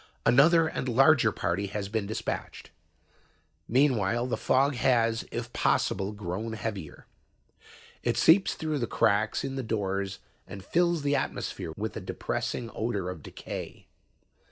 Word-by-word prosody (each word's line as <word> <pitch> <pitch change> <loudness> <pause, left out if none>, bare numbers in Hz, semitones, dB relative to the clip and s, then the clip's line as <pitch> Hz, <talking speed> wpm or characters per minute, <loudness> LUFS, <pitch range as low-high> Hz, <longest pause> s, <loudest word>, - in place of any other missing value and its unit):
Another 160 +6 +6
and 130 - -3
larger 130 -1 +5
party 95 +1 -2
has 100 0 -4
been 105 -1 -2
dispatched. 110 - -5 1.0
"Meanwhile, 120 -3 +2
the 125 - -1
fog 140 +2 +2
has, 115 -3 +2
if - - -5
possible, 95 +1 +1
grown 105 +2 -4
heavier. 105 -7 -6 1.0
It - - 0
seeps 185 +4 +5
through 155 -2 -2
the 120 - -1
cracks 105 +1 +1
in 135 0 -4
the - - -1
doors 100 -4 -2 0.3
and 100 -1 -9
fills 170 - +1
the 145 0 +2
atmosphere 80 - -3
with 110 +1 -4
a 110 - -4
depressing 115 +5 -3
odor 100 -5 -2
of 85 -4 -9
decay. - - -8
115 Hz, 135 wpm, -28 LUFS, 100-135 Hz, 1.0 s, Another